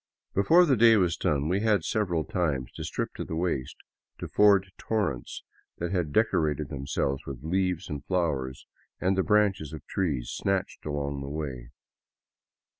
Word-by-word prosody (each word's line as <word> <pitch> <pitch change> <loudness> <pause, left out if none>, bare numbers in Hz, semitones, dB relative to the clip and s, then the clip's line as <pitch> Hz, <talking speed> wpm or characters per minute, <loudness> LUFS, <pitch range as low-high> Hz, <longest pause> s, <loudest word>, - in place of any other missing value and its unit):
Before 165 - +5
the 140 -5 +3
day 115 0 +6
was 90 -4 +2
done 75 0 0
we 90 +4 +1
had 105 -5 +2
several 90 -6 0
times 75 -9 -1
to - - -7
strip - - -3
to - - -3
the 80 - -5
waist 80 -7 -2 0.4
to - - -6
ford 100 -2 +4
torrents 75 - -2 0.3
that 85 +1 -3
had 90 -6 -1
decorated 80 -7 +1
themselves 70 0 -2
with 65 -1 -7
leaves 90 +1 0
and 75 -2 -5
flowers 70 -8 -1 0.3
and 95 +1 +1
the 95 - +2
branches 100 -8 +2
of 80 - -8
trees 75 -11 -2
snatched 95 -5 -2
along 70 -1 -2
the 70 - -5
way. 70 -5 -5
85 Hz, 160 wpm, -28 LUFS, 70-100 Hz, 0.4 s, day